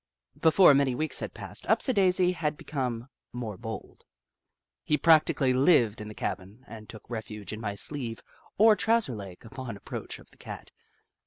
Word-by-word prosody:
Before 165 0 +6
many 135 -2 +2
weeks 155 +3 -3
had - - -6
passed, - - -4
Upsidaisi 185 -7 +4
had 155 -4 -2
become 125 -5 -4 0.2
more 115 -4 -5
bold. 110 0 -8 0.8
He 150 - +1
practically 150 -4 +4
lived 125 - +3
in 105 - -7
the 105 - -9
cabin, 100 +6 -5
and 110 -2 -11
took 110 - -11
refuge 110 -3 -6
in 110 - -7
my 105 -2 -3
sleeve 120 0 -2 0.3
or 220 +1 +6
trouser 225 - +1
leg 100 -1 -10
upon 125 -2 -7
approach - - -7
of - - -19
the - - -21
Cat. - - -9
125 Hz, 160 wpm, -28 LUFS, 110-155 Hz, 0.8 s, Before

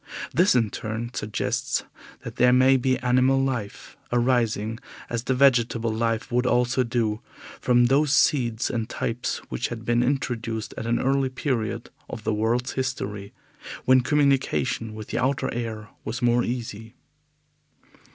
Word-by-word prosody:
This 180 -1 +4
in 115 -4 +2
turn 110 +2 -4
suggests 105 0 -2 0.4
that - - -8
there 125 0 +5
may 130 +1 +5
be 130 0 +1
animal 130 +2 +3
life, 125 -6 -3
arising, 115 -3 +1 0.3
as 120 0 -2
the 130 - +1
vegetable 120 -4 +3
life 115 0 -1
would 125 +1 +1
also 125 +1 +2
do, 115 -3 -1 0.4
from 120 -1 +4
those 140 +3 +3
seeds 120 -6 +2
and 115 -3 -3
types 120 +1 -2
which 60 - -2
had 115 -2 -7
been 120 0 +2
introduced 120 -4 -2
at 115 - -5
an 120 +1 +1
early 135 0 +1
period 120 -4 -3 0.2
of 110 - -7
the 110 - 0
world's 115 +4 0
history, 105 -6 -4 0.5
when 130 0 +6
communication 130 - +1
with 110 -1 -8
the - - -1
outer 130 +2 0
air 110 -3 -5
was 115 +3 -4
more 120 -1 +3
easy. 115 -2 -5
120 Hz, 145 wpm, -25 LUFS, 110-130 Hz, 0.5 s, when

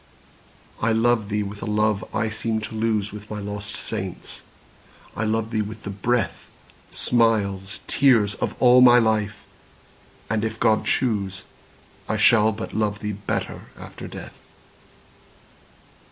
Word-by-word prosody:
I 115 0 +2
love 115 -2 +2
thee 105 0 0
with 100 +1 -7
a - - -4
love 105 -1 +1
I 110 0 0
seemed 110 0 -2
to 110 - -6
lose 110 -2 0
With 105 0 -10
my 105 - -4
lost 100 0 -6
saints,—I 100 +1 -8
love 110 +1 -1
thee 110 -2 +1
with 105 +1 -7
the 100 - -5
breath, 115 +4 -1 0.4
Smiles, 100 -6 +1
tears, 115 -7 +3
of - - -3
all 125 0 +7
my 125 -1 +8
life!—and, 110 -1 -3
if 110 0 -3
God 110 0 +2
choose, 100 -6 0 0.7
I 110 - 0
shall 110 0 +5
but 110 +1 -6
love 105 -1 -1
thee 105 0 -3
better 100 0 -4
after - - -9
death. - - -10
110 Hz, 135 wpm, -23 LUFS, 105-115 Hz, 0.7 s, my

